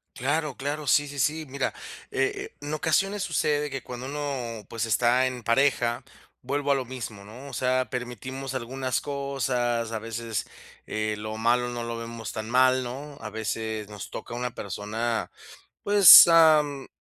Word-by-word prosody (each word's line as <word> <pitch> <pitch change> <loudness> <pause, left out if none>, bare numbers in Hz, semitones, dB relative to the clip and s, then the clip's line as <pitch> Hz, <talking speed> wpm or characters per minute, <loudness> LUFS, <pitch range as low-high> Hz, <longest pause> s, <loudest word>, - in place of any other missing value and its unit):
Claro, 145 +2 -1
claro, 145 +1 -4
sí, 145 +2 +4
sí, 145 -1 -7
sí. 155 +4 0
Mira, 135 +1 -2 0.4
eh, 400 +1 -2
en 145 +1 -5
ocasiones 195 +6 +1
sucede 150 -5 0
que 135 -2 -5
cuando 125 +1 -7
uno, 135 -6 -4
pues, 115 0 -3
está 120 +3 +3
en 125 -2 -6
pareja, 120 -1 +1 0.4
vuelvo 140 +2 -1
a - - +4
lo 130 -2 -2
mismo, 115 -5 -7
¿no?, 125 +7 -11
o - - -12
sea, 130 0 0
permitimos 130 +2 -5
algunas 130 +1 -2
cosas, 125 -4 -2
a 110 - -3
veces, 115 -2 -4 0.4
eh, 110 0 -2
lo 110 +1 -5
malo 120 +2 +2
no 120 -1 -4
lo 115 0 -4
vemos 115 0 -6
tan 110 0 -6
mal, 130 +1 +4
¿no? 140 +4 -7
A - - -6
veces 110 -1 -4
nos 105 -2 -8
toca - - -8
una 125 0 -3
persona, 110 +4 -3 0.5
pues, 200 -4 +10
am, 155 -4 +4
130 Hz, 160 wpm, -26 LUFS, 115-145 Hz, 0.5 s, pues